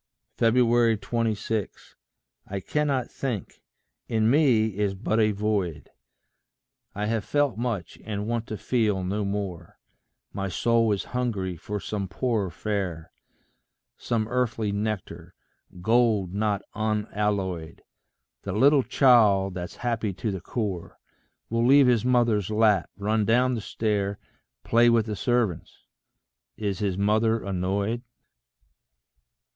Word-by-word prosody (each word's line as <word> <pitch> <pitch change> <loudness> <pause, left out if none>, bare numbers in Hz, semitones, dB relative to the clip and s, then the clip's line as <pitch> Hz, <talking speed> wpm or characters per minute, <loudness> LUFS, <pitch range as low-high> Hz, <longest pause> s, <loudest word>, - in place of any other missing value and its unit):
26. 115 -2 +1 0.5
I 100 0 -4
cannot 140 +4 0
think; 120 -8 -5 0.5
in 110 0 +2
me 125 -7 +4
is 100 -1 0
but 110 +3 -1
a 110 -1 +4
void; 100 -6 -2 1.0
I 105 +1 -2
have 110 -1 -1
felt 145 +1 +1
much, 110 -7 -4
and 105 -1 -4
want 115 0 -2
to 110 - -5
feel 105 -7 0
no 100 +3 -1
more; 100 -4 -4 0.6
My 100 -1 -3
soul 115 +2 +2
is 100 - 0
hungry 105 -8 -1
for 105 +5 -5
some 100 -1 -4
poorer 110 -2 -1
fare 90 -5 -4 0.8
Some 110 -2 -2
earthly 115 -3 -1
nectar, 100 -5 -4 0.5
gold 110 -4 +2
not 105 -1 0
unalloyed: 105 -6 -2 0.6
The 100 - -4
little 140 +6 +5
child 105 -8 +4
that's 90 -1 -6
happy 115 -4 -1
to 105 +4 -3
the 95 -2 -5
core, 95 -3 -4 0.5
Will 115 +1 0
leave 135 +3 +6
his 120 -4 +3
mother's 120 -6 +2
lap, 105 -4 +3
run 105 +2 0
down 125 +4 +3
the 115 - -3
stair, 100 -2 -1 0.5
Play 120 +1 +4
with 115 -2 +3
the 105 -2 -3
servants 115 -3 -1 0.8
is 100 -3 -2
his 100 -3 -1
mother 110 +2 +2
annoyed? 100 +4 -1
105 Hz, 120 wpm, -26 LUFS, 100-115 Hz, 1.0 s, leave